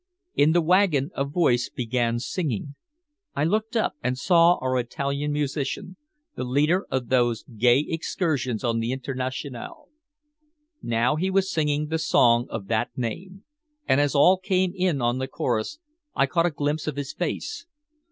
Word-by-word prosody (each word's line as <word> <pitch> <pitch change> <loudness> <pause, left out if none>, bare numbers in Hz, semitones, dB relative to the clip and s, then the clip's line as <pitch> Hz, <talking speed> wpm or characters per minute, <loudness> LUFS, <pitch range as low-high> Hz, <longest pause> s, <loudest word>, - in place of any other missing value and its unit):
In 150 +2 +4
the 175 -1 +3
wagon 170 -4 +3
a 140 - -1
voice 140 -4 +1
began 120 -2 -1
singing. 140 - -3 0.6
I 145 - 0
looked 215 +7 0
up 220 - +1
and 125 +1 -1
saw 170 +4 +5
our 130 -3 -1
Italian 140 +4 -2
musician, 145 +4 -3 0.4
the - - -3
leader 150 +9 +1
of 130 -3 -2
those 120 -3 +2
gay 120 +5 +2
excursions 155 - -2
on 115 -2 0
The 115 +2 -1
Internationale. 130 - -5 0.9
Now 120 +6 +1
he 185 +4 0
was 195 0 +1
singing 150 -1 0
the 160 0 -1
song 120 -5 +3
of 110 -3 -5
that 110 +2 0
name. 185 - -5 0.4
And 135 - +4
as 145 0 0
all 180 +7 +6
came 185 -1 0
in 180 -8 0
on 120 +2 +1
the 130 - -2
chorus, 120 - -2 0.4
I 135 - +3
caught 170 +6 +1
a - - +1
glimpse 150 0 -2
of 155 - -2
his 140 -1 -4
face. 340 -6 -4
145 Hz, 160 wpm, -25 LUFS, 125-170 Hz, 0.9 s, all